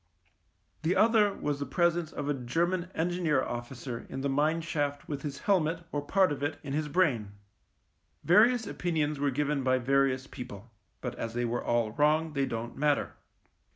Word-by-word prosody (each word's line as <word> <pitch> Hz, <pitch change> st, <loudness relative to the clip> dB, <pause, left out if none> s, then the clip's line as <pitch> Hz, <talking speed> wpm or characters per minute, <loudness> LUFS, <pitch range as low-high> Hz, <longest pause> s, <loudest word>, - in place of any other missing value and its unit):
The 165 Hz, +4 st, +1 dB
other 215 Hz, 0 st, +4 dB
was 145 Hz, -6 st, -3 dB
the 140 Hz, -, -2 dB
presence 170 Hz, +2 st, +1 dB
of 145 Hz, -, -4 dB
a 145 Hz, -, +2 dB
German 170 Hz, +8 st, -1 dB
Engineer 165 Hz, -5 st, +1 dB
Officer 120 Hz, 0 st, -6 dB
in 135 Hz, -, -5 dB
the 140 Hz, -, 0 dB
mine 155 Hz, +4 st, +1 dB
shaft 145 Hz, -3 st, -2 dB
with 145 Hz, -2 st, -4 dB
his 140 Hz, -1 st, -5 dB
helmet, 165 Hz, -4 st, +1 dB
or 145 Hz, -, -1 dB
part 185 Hz, +5 st, +3 dB
of 140 Hz, -1 st, -4 dB
it, 145 Hz, +2 st, -1 dB
in 140 Hz, -2 st, -5 dB
his 150 Hz, +1 st, -1 dB
brain. 140 Hz, -, +1 dB, 0.9 s
Various 225 Hz, +6 st, +5 dB
opinions 155 Hz, -6 st, -1 dB
were 145 Hz, 0 st, +2 dB
given 145 Hz, +1 st, 0 dB
by 130 Hz, 0 st, +2 dB
various 135 Hz, +1 st, +2 dB
people; 120 Hz, -5 st, -9 dB, 0.3 s
but 125 Hz, -2 st, -3 dB
as 115 Hz, 0 st, -4 dB
they 120 Hz, 0 st, 0 dB
were 120 Hz, +1 st, -2 dB
all 120 Hz, -2 st, +1 dB
wrong, 150 Hz, +5 st, +2 dB
they 140 Hz, -2 st, 0 dB
don't 115 Hz, +1 st, -4 dB
matter. 145 Hz, 0 st, +1 dB
145 Hz, 175 wpm, -29 LUFS, 130-165 Hz, 0.9 s, Various